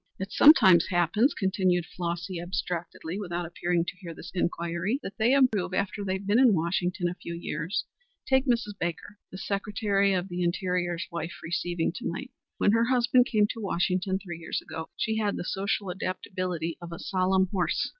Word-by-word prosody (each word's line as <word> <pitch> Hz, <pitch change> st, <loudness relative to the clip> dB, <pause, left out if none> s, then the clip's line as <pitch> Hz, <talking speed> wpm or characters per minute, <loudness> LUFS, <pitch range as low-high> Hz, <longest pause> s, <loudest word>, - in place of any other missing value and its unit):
"It 190 Hz, +1 st, -5 dB
sometimes 205 Hz, -, +7 dB
happens," 180 Hz, -, +2 dB
continued 185 Hz, -2 st, +1 dB
Flossy 175 Hz, +1 st, -4 dB
abstractedly, 175 Hz, 0 st, -4 dB
without 175 Hz, -3 st, -3 dB
appearing 170 Hz, 0 st, -1 dB
to 180 Hz, -, -5 dB
hear 170 Hz, -4 st, -8 dB
this 175 Hz, -, -9 dB
inquiry, 170 Hz, +6 st, -1 dB
"that 195 Hz, -, -6 dB
they 225 Hz, +3 st, +4 dB
improve 225 Hz, -9 st, +3 dB
after 200 Hz, +1 st, -1 dB
they've 190 Hz, 0 st, -2 dB
been 205 Hz, +4 st, +3 dB
in 250 Hz, -6 st, +6 dB
Washington 175 Hz, +2 st, 0 dB
a 175 Hz, -, -2 dB
few 170 Hz, -1 st, -7 dB
years. 170 Hz, +1 st, -3 dB, 0.4 s
Take 265 Hz, +1 st, +2 dB
Mrs. 235 Hz, -4 st, +1 dB
Baker, 175 Hz, +4 st, -4 dB
the 185 Hz, -, -7 dB
Secretary 200 Hz, 0 st, 0 dB
of 185 Hz, 0 st, -1 dB
the 180 Hz, -1 st, -4 dB
Interior's 175 Hz, -1 st, -1 dB
wife, 170 Hz, -1 st, -4 dB
receiving 175 Hz, 0 st, -1 dB
to -, -, -4 dB
night. 265 Hz, +10 st, -6 dB, 0.3 s
When 205 Hz, -, +3 dB
her 230 Hz, +1 st, +3 dB
husband 250 Hz, 0 st, +4 dB
came 215 Hz, -5 st, +3 dB
to 225 Hz, -, -8 dB
Washington 185 Hz, 0 st, 0 dB
three 175 Hz, -4 st, -8 dB
years 160 Hz, -, -3 dB
ago 160 Hz, 0 st, -7 dB
she 220 Hz, -1 st, 0 dB
had 210 Hz, -2 st, 0 dB
the -, -, -4 dB
social 195 Hz, +1 st, -1 dB
adaptability 185 Hz, -2 st, -3 dB
of 170 Hz, 0 st, -8 dB
a 170 Hz, -, -6 dB
solemn 190 Hz, +1 st, +1 dB
horse. 185 Hz, -3 st, 0 dB
185 Hz, 175 wpm, -28 LUFS, 175-205 Hz, 0.4 s, sometimes